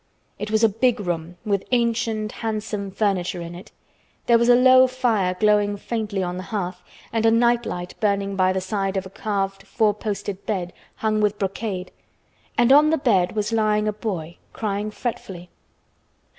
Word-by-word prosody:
It 210 - -4
was 220 +1 +1
a - - +8
big 225 +3 +1
room 175 -2 -4
with 200 -2 0
ancient, 230 -3 0
handsome 215 -2 -4
furniture 190 -3 -1
in 170 0 -7
it. 175 +2 -11 0.5
There 235 -1 +5
was 235 +1 +2
a 245 - +8
low 255 +1 +7
fire 230 -8 0
glowing 205 -1 +3
faintly 210 -3 -3
on 180 0 -3
the - - -4
hearth 195 -4 -3 0.3
and 225 -1 +1
a 225 - +5
night 235 +1 +3
light 175 0 -5
burning 200 -2 0
by 185 -1 +3
the 190 0 -1
side 195 0 -2
of 190 - -2
a 190 - -10
carved 195 -2 -2
four 210 +1 +2
posted 205 -2 -4
bed 180 -5 -2 0.2
hung 215 -1 0
with 210 0 +1
brocade, 195 -1 -3 0.7
and 240 +1 +4
on 300 +2 +6
the 320 - +2
bed 195 - +2
was 210 +1 -1
lying 215 -1 +2
a 210 - 0
boy, 180 -6 -5 0.2
crying 210 -1 -2
fretfully. 190 -6 -6
210 Hz, 175 wpm, -23 LUFS, 190-225 Hz, 0.7 s, a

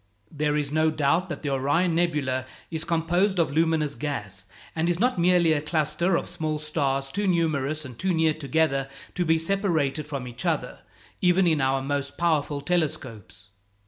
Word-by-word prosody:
There 150 -1 0
is 145 -1 -2
no 155 +1 +3
doubt 155 +4 +1
that 155 - -6
the 145 - -1
Orion 145 +6 +1
nebula 145 -7 0 0.2
is 160 -1 -1
composed 170 +4 +1
of 165 -5 +2
luminous 160 -1 +1
gas, 105 -11 -5 0.3
and 165 +1 0
is 175 0 0
not 245 -3 +2
merely 175 -2 +4
a 145 - 0
cluster 155 +3 +1
of - - -4
small 155 -3 -2
stars 140 -3 -1
too 205 +4 -1
numerous 155 -4 0
and 125 -3 -10
too 190 +1 0
near 160 -2 +2
together 140 -2 0 0.2
to 180 - 0
be 160 0 +3
separated 165 -5 0
from 140 -4 -5
each 120 -1 -7
other, - - -1 0.4
even 180 +1 +4
in 160 -4 +2
our 135 0 +1
most 140 0 -3
powerful 150 -4 0
telescopes. 130 - -3
155 Hz, 175 wpm, -25 LUFS, 140-170 Hz, 0.4 s, merely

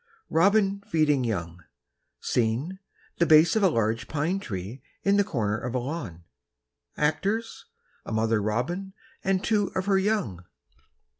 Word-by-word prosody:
Robin 200 +3 +3
Feeding 150 -4 +2
Young: 85 -6 -3 0.6
Scene, 125 +11 -1 0.4
the 170 - +3
base 155 +3 +6
of 220 - +2
a 195 - +5
large 115 -5 0
pine 160 +6 -1
tree 100 - -6 0.2
in 200 +1 +3
the 205 - +5
corner 110 - -1
of 125 +1 -4
a - - +3
lawn; 120 - -5 0.7
actors, 200 +9 -1 0.4
a - - -8
mother 110 0 +1
robin 150 - -2 0.3
and 190 0 +1
two 210 -3 +2
of 185 - -1
her 195 -1 +3
young. 190 - -1
150 Hz, 140 wpm, -26 LUFS, -, 0.7 s, base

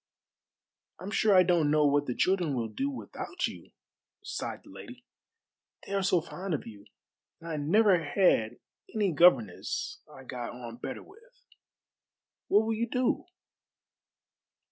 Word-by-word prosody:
"I'm 185 +4 -6
sure 215 -2 +3
I 185 - +8
don't 170 -4 +2
know 150 0 +4
what 145 0 +2
the 125 - -2
children 180 -6 +1
will 115 -2 -2
do 275 - -2
without 355 +6 -5
you," - - -8 0.5
sighed - - -5
the - - -15
lady; 250 0 -11 0.8
"they - - -6
are 200 - +1
so 185 -2 +2
fond 180 +1 -4
of - - -6
you, 105 -2 -12 0.5
and 165 - -11
I 160 -2 -3
never 180 +4 +3
had 145 - +2 0.4
any 205 -4 +2
governess 135 - +2
I 135 - -12
got 125 -2 -6
on 120 -1 -9
better - - -6
with. 480 +5 -21 1.0
What 210 +2 +4
will 225 - 0
you 230 +1 -2
do?" 250 +7 0
175 Hz, 145 wpm, -29 LUFS, 140-215 Hz, 1.0 s, I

